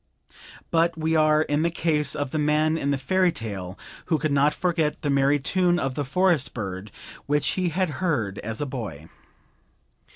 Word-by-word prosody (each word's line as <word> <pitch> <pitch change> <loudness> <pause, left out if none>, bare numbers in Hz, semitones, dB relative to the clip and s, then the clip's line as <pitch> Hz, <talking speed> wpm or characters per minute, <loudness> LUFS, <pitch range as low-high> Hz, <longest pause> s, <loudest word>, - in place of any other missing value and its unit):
But 165 0 +2
we 160 0 0
are 155 0 +4
in 145 0 0
the 170 - +2
case 155 -4 0
of 145 -3 -3
the 155 - -1
man 150 +1 +2
in 140 -3 -1
the 140 - +1
fairy 185 +7 +2
tale 100 - -6 0.3
who 160 - +1
could 155 0 -1
not 140 +1 +4
forget 165 -4 -1
the 145 - +1
merry 140 +1 +3
tune 175 +5 +1
of 135 -6 -1
the 145 - -2
forest 170 +1 +1
bird 95 -2 -5 0.4
which 145 0 +1
he 185 -2 0
had 180 0 0
heard 115 - -1
as 110 +1 -5
a - - 0
boy. 105 - -6
150 Hz, 185 wpm, -25 LUFS, 130-165 Hz, 0.4 s, are